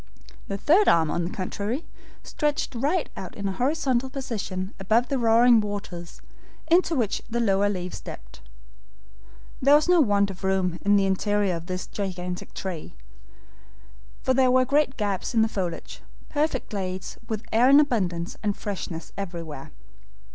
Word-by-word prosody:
The 200 Hz, -, -3 dB
third 345 Hz, -, +4 dB
arm, 160 Hz, -2 st, +4 dB
on 175 Hz, -, -1 dB
the -, -, -2 dB
contrary, 205 Hz, -, -3 dB, 0.4 s
stretched 295 Hz, -2 st, -1 dB
right 290 Hz, +9 st, 0 dB
out 185 Hz, -, -7 dB
in 200 Hz, -, -3 dB
a -, -, 0 dB
horizontal 260 Hz, +2 st, 0 dB
position 210 Hz, -8 st, -4 dB
above 220 Hz, +6 st, +2 dB
the 275 Hz, -, 0 dB
roaring 230 Hz, 0 st, +5 dB
waters, 200 Hz, -5 st, -6 dB, 0.5 s
into 345 Hz, -1 st, +4 dB
which 225 Hz, -5 st, 0 dB
the 235 Hz, +1 st, -1 dB
lower 200 Hz, -3 st, +2 dB
leaves 180 Hz, -2 st, -4 dB
dipped. -, -, -10 dB, 1.2 s
There 280 Hz, +2 st, +6 dB
was 300 Hz, +2 st, +3 dB
no 355 Hz, -2 st, +5 dB
want 200 Hz, -5 st, +2 dB
of 190 Hz, -, -12 dB
room 190 Hz, -2 st, 0 dB
in 205 Hz, +1 st, +4 dB
the 200 Hz, -1 st, +4 dB
interior 200 Hz, 0 st, +1 dB
of 165 Hz, 0 st, -7 dB
this 185 Hz, 0 st, -3 dB
gigantic 180 Hz, -3 st, -5 dB
tree, 180 Hz, -5 st, -6 dB, 1.3 s
for 260 Hz, -, +2 dB
there 260 Hz, 0 st, +4 dB
were 255 Hz, 0 st, +4 dB
great 280 Hz, 0 st, +1 dB
gaps 205 Hz, +2 st, -2 dB
in 225 Hz, -, +5 dB
the -, -, +2 dB
foliage, 185 Hz, -6 st, -4 dB, 0.3 s
perfect 295 Hz, -3 st, -1 dB
glades, 185 Hz, -2 st, -4 dB
with 220 Hz, 0 st, -3 dB
air 240 Hz, +4 st, +5 dB
in 280 Hz, +1 st, +8 dB
abundance, 185 Hz, -, 0 dB
and 205 Hz, -2 st, -1 dB
freshness 185 Hz, -5 st, -5 dB
everywhere. 170 Hz, -7 st, -6 dB
205 Hz, 155 wpm, -25 LUFS, 185-255 Hz, 1.3 s, in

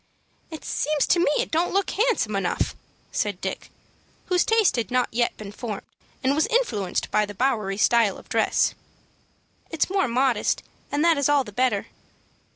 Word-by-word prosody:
"It 315 Hz, -2 st, -9 dB
seems 300 Hz, -1 st, 0 dB
to 355 Hz, -, +3 dB
me 345 Hz, -, +3 dB
it -, -, -1 dB
don't 340 Hz, +3 st, 0 dB
look 395 Hz, -1 st, +1 dB
handsome 415 Hz, -, +1 dB
enough," 190 Hz, -3 st, -1 dB, 0.4 s
said 205 Hz, -4 st, -1 dB
Dick, -, -, -5 dB, 0.6 s
whose 360 Hz, -1 st, +2 dB
taste 445 Hz, -4 st, +3 dB
had 235 Hz, -2 st, -2 dB
not 250 Hz, -1 st, +1 dB
yet 240 Hz, +1 st, 0 dB
been 205 Hz, -2 st, -8 dB
formed, 210 Hz, -1 st, -6 dB, 0.4 s
and 265 Hz, +2 st, +3 dB
was 310 Hz, +2 st, +2 dB
influenced 445 Hz, -, 0 dB
by 210 Hz, -, +3 dB
the 205 Hz, 0 st, -6 dB
Bowery 215 Hz, -5 st, 0 dB
style 225 Hz, -2 st, +3 dB
of -, -, -15 dB
dress. -, -, +2 dB, 1.0 s
"It's 325 Hz, +2 st, -1 dB
more 385 Hz, -6 st, +2 dB
modest, 250 Hz, -2 st, +1 dB, 0.3 s
and 290 Hz, +3 st, +1 dB
that 330 Hz, -3 st, +4 dB
is 285 Hz, -, +2 dB
all 290 Hz, -2 st, +4 dB
the 210 Hz, -, -10 dB
better." 245 Hz, -2 st, +1 dB
255 Hz, 170 wpm, -24 LUFS, 210-325 Hz, 1.0 s, that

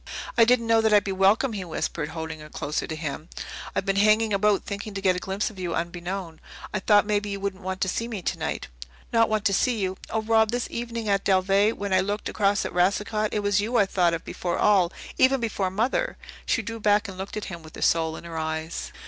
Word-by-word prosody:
"I 230 Hz, -, +6 dB
didn't 235 Hz, 0 st, +3 dB
know 225 Hz, 0 st, +4 dB
that 220 Hz, -1 st, +2 dB
I'd 205 Hz, -, +5 dB
be 200 Hz, -, -3 dB
welcome," 200 Hz, +6 st, +3 dB
he 200 Hz, -3 st, -3 dB
whispered, 160 Hz, -2 st, -3 dB
holding 160 Hz, -1 st, -6 dB
her 150 Hz, 0 st, -11 dB
closer 150 Hz, 0 st, -3 dB
to 160 Hz, -, -4 dB
him. 155 Hz, +1 st, -5 dB, 0.5 s
"I've -, -, 0 dB
been 195 Hz, -1 st, 0 dB
hanging 215 Hz, +1 st, +4 dB
about 200 Hz, 0 st, +2 dB
thinking 200 Hz, 0 st, -5 dB
to 195 Hz, -, -3 dB
get 185 Hz, -2 st, +3 dB
a -, -, -2 dB
glimpse 195 Hz, +4 st, -2 dB
of 195 Hz, -, -13 dB
you 175 Hz, -2 st, -2 dB
unbeknown. 175 Hz, 0 st, -4 dB, 0.3 s
I 210 Hz, -, 0 dB
thought 205 Hz, +2 st, +4 dB
maybe 205 Hz, 0 st, 0 dB
you 200 Hz, 0 st, -3 dB
wouldn't 195 Hz, -1 st, -4 dB
want 185 Hz, 0 st, -4 dB
to -, -, +2 dB
see 230 Hz, +5 st, -2 dB
me 215 Hz, -6 st, -5 dB
tonight." -, -, -3 dB, 0.5 s
"Not 230 Hz, -1 st, +4 dB
want 215 Hz, -1 st, 0 dB
to 200 Hz, -, +3 dB
see 240 Hz, +4 st, +2 dB
you! 190 Hz, -2 st, -2 dB
Oh, 220 Hz, -, -1 dB
Rob, 220 Hz, 0 st, +3 dB
this 245 Hz, +1 st, -1 dB
evening 235 Hz, -1 st, -4 dB
at 200 Hz, -1 st, +2 dB
Dalveigh, 195 Hz, +3 st, +3 dB
when 200 Hz, -1 st, -3 dB
I 185 Hz, -, +5 dB
looked 205 Hz, +2 st, -2 dB
across 200 Hz, 0 st, +1 dB
to -, -, -4 dB
Racicot, 210 Hz, +4 st, +1 dB
it 210 Hz, -, -1 dB
was 205 Hz, 0 st, +2 dB
you 235 Hz, +4 st, 0 dB
I 205 Hz, -, +5 dB
thought 175 Hz, -3 st, +2 dB
of 165 Hz, -, -8 dB
before 175 Hz, -1 st, -3 dB
all 190 Hz, -4 st, +4 dB, 0.3 s
even 260 Hz, +1 st, +5 dB
before 205 Hz, -5 st, -1 dB
Mother." 240 Hz, -, 0 dB, 0.3 s
She 225 Hz, -, +1 dB
drew 225 Hz, +2 st, -5 dB
back 210 Hz, 0 st, +3 dB
and 195 Hz, -, -8 dB
looked 190 Hz, +3 st, -6 dB
at 210 Hz, -, -4 dB
him 170 Hz, -4 st, -7 dB
with 155 Hz, 0 st, -13 dB
her -, -, -4 dB
soul 160 Hz, -1 st, +2 dB
in -, -, -9 dB
her 165 Hz, -1 st, -5 dB
eyes. 160 Hz, +1 st, -4 dB
200 Hz, 240 wpm, -25 LUFS, 180-215 Hz, 0.5 s, I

